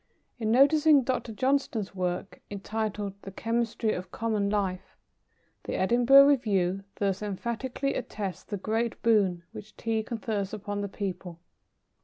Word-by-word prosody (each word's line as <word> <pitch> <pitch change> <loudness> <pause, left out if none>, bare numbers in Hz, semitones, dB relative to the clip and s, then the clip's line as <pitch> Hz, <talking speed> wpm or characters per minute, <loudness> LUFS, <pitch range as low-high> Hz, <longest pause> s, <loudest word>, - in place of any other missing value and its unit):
In 220 -2 -1
noticing 290 +3 +5
Dr. 250 -2 -2
Johnston's 255 -3 0
work, 180 0 -3
entitled 205 0 -3
"The - - -8
Chemistry 230 +1 -1
of 180 - -6
Common 215 -3 -1
Life," 195 -3 -2 0.7
the - - -3
Edinburgh 245 +7 +6
Review 195 -9 +2
thus 195 -1 -1
emphatically 235 +6 -3
attests 210 -6 -5
the 205 - -4
great 225 +4 -2
boon 195 -7 +3
which 205 - -11
Tea 225 -1 -1
confers 215 -3 -3
upon 205 0 -4
the 200 - -3
people. 185 -4 -5
215 Hz, 130 wpm, -28 LUFS, 195-235 Hz, 0.7 s, Edinburgh